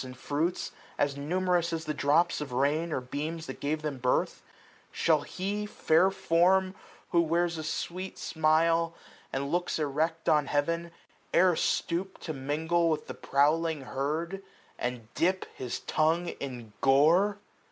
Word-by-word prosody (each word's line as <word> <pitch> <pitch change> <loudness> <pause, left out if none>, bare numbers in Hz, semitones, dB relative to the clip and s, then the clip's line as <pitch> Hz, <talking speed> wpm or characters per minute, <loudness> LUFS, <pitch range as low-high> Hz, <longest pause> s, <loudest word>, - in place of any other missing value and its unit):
And 130 -1 -9
fruits, 155 +7 -1 0.3
as 145 -1 +1
numerous 175 +3 0
as 165 0 -3
the 155 - -2
drops 150 +4 +2
of 145 -3 -5
rain 145 +6 +1
Or - - 0
beams 155 +6 -4
that - - -7
gave 155 +2 -2
them 145 -4 -3
birth: 125 0 0 0.5
Shall - - +2
he, 205 +3 -3
fair 180 -1 +3
form! 185 +1 +3
SPRING. - - -12
15 - - -23 0.3
Who 170 - +5
wears 170 -1 0
sweet 185 +3 -4
smiles, 165 +1 +2 0.4
and 140 +1 -2
looks 175 +1 0
erect 160 +2 -1
on 150 -2 +3
Heaven, 170 +4 0 0.5
E'er 180 0 +5
stoop 180 +4 -1
to 160 - -4
mingle 160 +5 0
with 155 -1 -1
the - - -6
prowling 155 +2 +1
herd, 155 +8 -3 0.4
355 - - 0
And 115 -2 -8
dip 185 +2 +1
his 125 -2 -4
tongue 165 +3 +1
in 120 -8 -7
gore 165 +10 +4
160 Hz, 150 wpm, -29 LUFS, 145-170 Hz, 0.5 s, Who